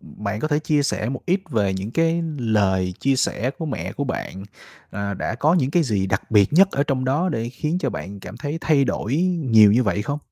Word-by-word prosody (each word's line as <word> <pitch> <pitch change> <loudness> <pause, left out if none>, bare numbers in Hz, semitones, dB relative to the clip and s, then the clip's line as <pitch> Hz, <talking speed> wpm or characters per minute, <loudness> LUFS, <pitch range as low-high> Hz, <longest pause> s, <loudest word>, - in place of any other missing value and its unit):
bạn 105 +1 -6
có 155 - -1
thể 150 -1 +1
chia 150 -1 +1
sẻ 125 -5 -1
một 130 0 -4
ít 185 +2 +2
về 100 -6 +1
những 95 +4 -4
cái 165 +3 +1 0.2
lời 95 -6 +1
chia 135 -1 +2
sẻ 125 -1 0
của 160 - -4
mẹ 145 - -4
của 140 - -3
bạn, 95 -7 -5 0.5
ờ, 100 0 -3
đã 95 - -3
có 150 +8 +2
những 140 -7 +1
cái 170 +2 +3
gì 105 -9 0
đặc 95 +3 -3
biệt 105 +1 +4
nhất 190 +5 +6
ở 140 - +1
trong 135 -3 -1
đó 145 +8 +1
để 115 -8 -2
khiến 150 +8 -2
cho - - -1
bạn 100 +1 -7
cảm 110 - -9
thấy 145 +4 -4
thay 150 -5 +3
đổi 125 -1 -2 0.3
nhiều 110 -7 +6
như 120 +4 +4
vậy 105 -2 0
không? 140 +6 -3
130 Hz, 240 wpm, -22 LUFS, 105-150 Hz, 0.5 s, nhất